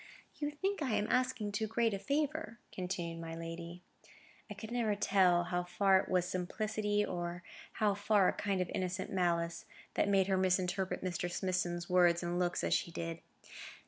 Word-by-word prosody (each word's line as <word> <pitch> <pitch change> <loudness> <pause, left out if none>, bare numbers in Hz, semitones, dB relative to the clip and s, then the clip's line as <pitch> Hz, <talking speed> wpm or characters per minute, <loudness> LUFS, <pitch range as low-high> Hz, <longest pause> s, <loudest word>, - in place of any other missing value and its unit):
"You 295 -1 -1
think 380 +6 -2
I 260 -6 0
am 205 - +1
asking 255 -5 +1
too 220 +2 -1
great 225 0 +1
a 195 - -2
favour," 295 -1 -1
continued 175 -3 -4
my 165 0 -6
lady. 170 +1 -7 0.7
(I 210 - -6 0.2
never 235 -3 +1
could 205 - -16
tell 180 -3 +4
how 175 +1 -1
far 190 +2 +3
it - - -4
was 180 -1 +2
simplicity, 210 +3 -1
or 175 0 -4 0.3
how 210 -2 +2
far 205 -1 +3
a - - +2
kind 195 -2 -1
of 180 - -2
innocent 185 +1 -2
malice, 170 -2 0 0.3
that - - +1
made 195 -1 +4
her 190 0 +1
misinterpret 185 0 0
Mr. 175 -1 -2
Smithson's 175 -2 -1
words 175 -1 +4
and 175 +1 -1
looks 175 -1 0
as - - +1
she - - +1
did.) 165 0 -4
185 Hz, 175 wpm, -34 LUFS, 175-210 Hz, 0.7 s, tell